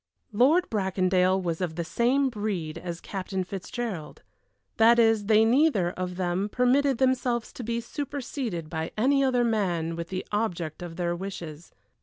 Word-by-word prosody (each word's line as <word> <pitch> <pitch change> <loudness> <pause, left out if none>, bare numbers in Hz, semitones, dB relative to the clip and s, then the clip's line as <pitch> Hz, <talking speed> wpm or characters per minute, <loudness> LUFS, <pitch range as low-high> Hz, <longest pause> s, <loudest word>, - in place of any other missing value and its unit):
Lord 280 - +4
Bracondale 190 -2 +2
was 170 -2 -3
of 170 -3 -2
the 170 - -2
same 255 - +1
breed 190 -8 -3
as 170 -1 -6
Captain 190 -1 -4
Fitzgerald 190 -3 -6 0.5
that 230 +1 +6
is, 225 -3 +3
they 220 0 +5
neither 235 - +3
of 180 0 -4
them 185 +2 -1
permitted 255 +3 +2
themselves 250 -2 0
to 250 - -7
be 235 +1 -2
superseded 245 - -4
by 160 0 -3
any 275 +5 +3
other 250 -2 +2
man 180 -8 0
with 170 0 -6
the 185 0 -4
object 180 -8 -2
of 175 -2 -7
their 175 -1 -1
wishes. 170 -4 -7
200 Hz, 155 wpm, -27 LUFS, 175-240 Hz, 0.5 s, that